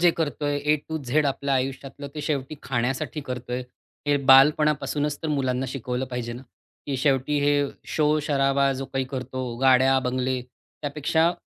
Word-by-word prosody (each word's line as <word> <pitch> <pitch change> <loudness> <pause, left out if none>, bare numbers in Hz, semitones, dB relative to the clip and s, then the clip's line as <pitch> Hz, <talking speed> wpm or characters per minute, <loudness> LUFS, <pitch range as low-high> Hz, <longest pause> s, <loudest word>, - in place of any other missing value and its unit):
जे 175 0 +6
करतोय, 145 -2 -1
ए 150 +1 +2
to 160 0 -2
Z 145 +4 +1
आपल्या 140 0 0
आयुष्यातलं 135 +2 -3
ते 150 - -4
शेवटी 145 -1 -2
खाण्यासाठी 125 +4 -2
करतोय. 125 -2 -4 0.4
हे 145 0 +3
बालपणापासूनच 145 +2 +4
तर 160 - -2
मुलांना 135 -3 0
शिकवलं 125 0 -3
पाहिजे 125 -1 -4
ना, 120 +2 -8 0.4
की 140 -2 -1
शेवटी 135 +1 +1
हे 145 0 +3 0.4
शोर-शराबा, 140 -3 +2
जो 135 +1 -4
काही 135 0 0
करतो 130 -2 -4
गाड्या, 130 0 +5
बंगले, 130 0 -1 0.4
त्यापेक्षा 155 +3 +1
135 Hz, 145 wpm, -25 LUFS, 130-150 Hz, 0.4 s, जे